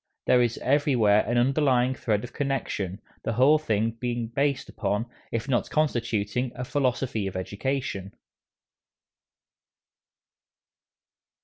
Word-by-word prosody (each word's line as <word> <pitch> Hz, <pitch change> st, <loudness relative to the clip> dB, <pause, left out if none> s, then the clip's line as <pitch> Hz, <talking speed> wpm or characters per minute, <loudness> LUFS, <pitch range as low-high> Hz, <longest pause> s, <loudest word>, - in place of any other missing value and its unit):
There 125 Hz, -, +5 dB
is 120 Hz, -1 st, +1 dB
everywhere 125 Hz, -7 st, +3 dB
an 120 Hz, -, +1 dB
underlying 130 Hz, 0 st, +3 dB
thread 110 Hz, -5 st, -1 dB
of 125 Hz, -, -8 dB
connection, 120 Hz, -9 st, -2 dB, 0.2 s
the 115 Hz, -, -1 dB
whole 135 Hz, +7 st, +5 dB
being 115 Hz, -1 st, -1 dB
based 140 Hz, 0 st, 0 dB
upon, 105 Hz, +1 st, -2 dB, 0.3 s
if 115 Hz, +3 st, -2 dB
not 130 Hz, -3 st, 0 dB
constituting, 120 Hz, -5 st, 0 dB
a 125 Hz, +1 st, -4 dB
philosophy 125 Hz, -6 st, 0 dB
of 95 Hz, -, -6 dB
education. 100 Hz, 0 st, -3 dB
120 Hz, 105 wpm, -26 LUFS, 110-135 Hz, 0.3 s, There